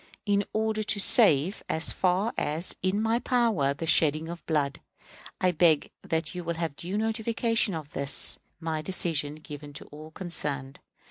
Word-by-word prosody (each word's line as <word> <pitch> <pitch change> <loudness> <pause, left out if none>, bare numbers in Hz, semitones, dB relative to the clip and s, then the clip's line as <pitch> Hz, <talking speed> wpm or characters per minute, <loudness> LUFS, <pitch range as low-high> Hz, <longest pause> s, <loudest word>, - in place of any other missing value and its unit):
In 205 -1 +1
order 220 0 -1
to 210 -1 -2
save 195 - +5
as 160 - +1
far 190 +5 0
as 160 +4 0
in 185 +2 0
my 225 +2 +1
power 230 - +1
the 165 - -5
shedding 155 0 +2
of 170 0 -8
blood, 145 -3 -1 0.6
I 185 - +2
beg 160 -2 +2
that 160 -1 -3
you 180 -1 -6
will 170 0 -3
have 165 -3 -4
due 180 +7 -5
notification 225 -1 0
of 155 -2 -8
this 140 0 +5 0.2
my 160 -2 -3
decision 155 -4 -2
given 150 -1 -11
to - - -8
all 155 +1 -11
concerned. 150 -6 -5
170 Hz, 160 wpm, -27 LUFS, 150-205 Hz, 0.6 s, save